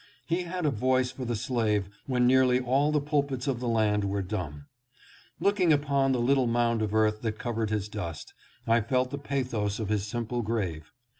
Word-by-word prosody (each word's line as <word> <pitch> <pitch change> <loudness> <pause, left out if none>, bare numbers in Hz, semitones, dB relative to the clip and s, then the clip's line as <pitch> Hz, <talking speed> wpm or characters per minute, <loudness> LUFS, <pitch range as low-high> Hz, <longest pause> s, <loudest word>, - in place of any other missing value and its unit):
He 175 +2 -1
had 180 -1 -3
a 150 - +3
voice 130 +2 +1
for 130 - -6
the 120 -1 -1
slave 110 -4 0 0.2
when 125 -2 +2
nearly 125 0 +4
all 135 +4 +2
the 150 - +2
pulpits 140 -3 -1
of 130 -4 0
the 125 - -3
land 110 -3 +2
were 100 0 -1
dumb. 85 -8 -5 0.7
Looking 200 -4 +3
upon 140 -2 +2
the 130 - +1
little 130 +1 +3
mound 115 -1 +1
of 110 0 -1
earth 110 0 +2
that 110 -2 -2
covered 115 -2 -2
his 105 -2 -1
dust, 85 -8 -6 0.3
I 115 +1 +3
felt 125 +3 0
the 140 - -4
pathos 125 -8 -2
of 110 -3 -4
his 105 -1 0
sim 120 +2 -3
ple 120 +2 -2
grave. 95 -9 -3
120 Hz, 200 wpm, -28 LUFS, 105-135 Hz, 0.7 s, nearly